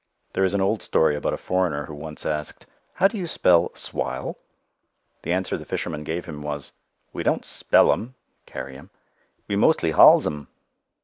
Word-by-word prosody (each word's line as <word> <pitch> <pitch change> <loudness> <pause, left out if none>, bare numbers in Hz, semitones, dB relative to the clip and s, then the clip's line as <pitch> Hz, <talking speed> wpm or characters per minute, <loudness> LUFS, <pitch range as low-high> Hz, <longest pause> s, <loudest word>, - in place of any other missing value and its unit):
There 95 - +1
is 95 +1 +1
an 100 - +1
old 100 +3 +1
story 75 -2 +2
about 75 - -1
a - - -8
foreigner 90 -6 -1
who 75 - -9
once 75 +1 -8
asked, 75 -1 -4 0.3
"How 195 - +5
do 215 +1 -6
you 175 - -3
spell 90 - +3
'swile'?" - - -4 0.9
The - - -4
answer 90 +1 -1
the - - -8
fisherman 75 -3 -4
gave 80 +3 -4
him 75 -3 -8
was, 75 -1 -4 0.4
"We - - -4
don't - - 0
spell 120 +4 +2 0.3
[carry] 65 0 -7
'em. - - -15 0.6
We 100 - -1
mostly 100 - +3
hauls 80 - +7
'em." 75 -3 -4
80 Hz, 175 wpm, -24 LUFS, 75-95 Hz, 0.9 s, hauls